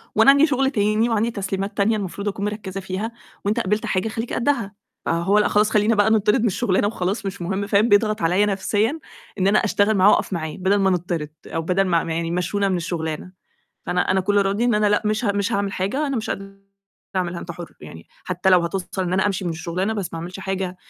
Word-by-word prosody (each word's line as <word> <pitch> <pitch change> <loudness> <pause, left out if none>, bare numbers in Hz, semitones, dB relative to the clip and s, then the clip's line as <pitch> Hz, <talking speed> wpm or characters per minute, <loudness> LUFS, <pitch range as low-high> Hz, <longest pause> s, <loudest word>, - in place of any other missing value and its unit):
وأنا 275 - +7
عندي 280 +2 +5
شغل 270 -2 +1
تاني، 215 0 +1
وعندي 225 +1 +1
تسليمات 195 -1 -4
تانية 215 +2 +2
المفروض 200 +1 -5
أكون 200 0 -2
مركّزة 205 -2 -4
فيها 190 +4 -4 0.3
وأنت 210 +4 +1
قبلت 210 -1 0
حاجة 185 +3 0
خلّيك 225 +2 -4
قدها، 235 -5 0 0.3
فهو 170 +5 +2
لأ - - +3
خلاص 210 +1 +3
خلّينا 215 +1 +3
بقى 205 +1 +3
نتطرد 210 -1 +3
من 230 - +2
الشغلانة 205 -1 +1
وخلاص 200 0 -2
مش 195 -1 -5
مهم، 190 +3 -2
فاهم؟ 210 +3 +3
بيضغط 215 +1 +3
عليّا 180 +5 +3
نفسيّا 210 +7 0 0.4
إن 190 - +2
أنا 205 +2 +4
أشتغل 210 0 +2
معاه، 190 +2 +6
وأقف - - +1
معاه، 160 -3 -3
بدل 190 +2 +2
ما 195 -1 +3
نتطرد 170 -4 -2 0.2
أو 165 - -3
بدل 180 +4 +1
ما 170 -3 +1
ما 165 - -3
يعني 165 0 -2
يمشّونا 185 +4 0
من 185 - +1
الشغلانة، 165 0 -4 0.6
فأنا 180 0 0
أنا 190 +1 +3
كل 205 +2 0
ردّي 200 +4 0
إن 240 -2 +2
أنا 210 0 +2
لأ 210 0 +2
مش 215 +3 0
ه 205 - +2
مش 200 +3 -1
هاعمِل 200 -1 0
حاجة 205 +12 -1
أنا 275 -2 -2
مش 225 - -3
قادرة 195 0 -6 0.6
أعملها 175 -2 -1
أنت 170 - -8
حُر، 170 0 -10
يعني 80 +2 -11 0.2
حتى 180 +3 0
لو 180 -1 +6
هتوصل 180 +2 -3
إن 180 -1 -2
أنا 190 +2 +2
أمشي 195 -2 -1
من 175 - -1
الشغلانة 170 +5 -2
بس 200 -5 -4
ما 165 - -5
أعملش 180 +3 -7
حاجة، 190 -1 -3
195 Hz, 225 wpm, -22 LUFS, 180-210 Hz, 0.6 s, وأنا